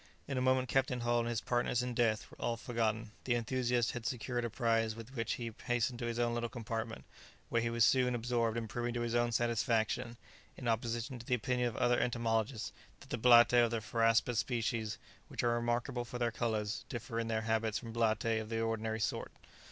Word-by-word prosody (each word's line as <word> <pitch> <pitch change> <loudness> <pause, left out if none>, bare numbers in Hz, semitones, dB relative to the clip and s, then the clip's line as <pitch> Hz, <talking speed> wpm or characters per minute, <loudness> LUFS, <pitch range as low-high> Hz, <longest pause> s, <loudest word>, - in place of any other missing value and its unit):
In 135 - -3
a 130 - 0
moment 130 0 +3
Captain 130 -1 +1
Hull 120 0 +2
and 115 0 -1
his 115 -1 -1
partners 120 0 +1
in 125 0 -3
death 115 -3 +1
were - - -14
all 115 - 0
forgotten; 115 -2 -1
the 125 - +2
enthusiast 120 0 +1
had 120 - -5
secured 120 +1 -2
a 120 - -1
prize 115 -1 +1
with 115 +3 -10
which 115 -3 -1
he 115 -2 -4 0.2
hastened 120 0 +1
to 120 - -2
his 115 0 -2
own 120 -1 +1
little 120 0 -1
compartment, 115 -2 -5 0.4
where 115 - +2
he 115 - 0
was 115 0 +4
soon 125 -2 +3
absorbed 115 -1 0
in 115 -1 -2
proving 120 +2 -3
to 120 - -1
his 120 -1 -1
own 120 0 +2
satisfaction, 115 0 0 0.4
in 125 - -5
opposition 120 +2 -1
to 115 - -10
the 125 - +3
opinion 125 +1 0
of 115 - -4
other 120 -1 +3
entomologists, 115 -1 0 0.3
that 140 - -15
the - - 0
blattae 120 0 +7
of 120 - +2
the 115 - -1
phoraspous 115 +1 +2
species, 115 -3 -1 0.3
which - - -4
are 120 -1 +3
remarkable 120 +2 -1
for 120 +1 -6
their 120 -1 0
colours, 110 -2 -1
differ 120 0 -4
in 115 - -1
their 110 -1 0
habits 110 -1 +1
from 115 -2 -7
blattae 110 0 +1
of 110 - -8
the 115 -1 -1
ordinary 110 -1 -1
sort. - - -2
120 Hz, 215 wpm, -34 LUFS, 115-120 Hz, 0.4 s, blattae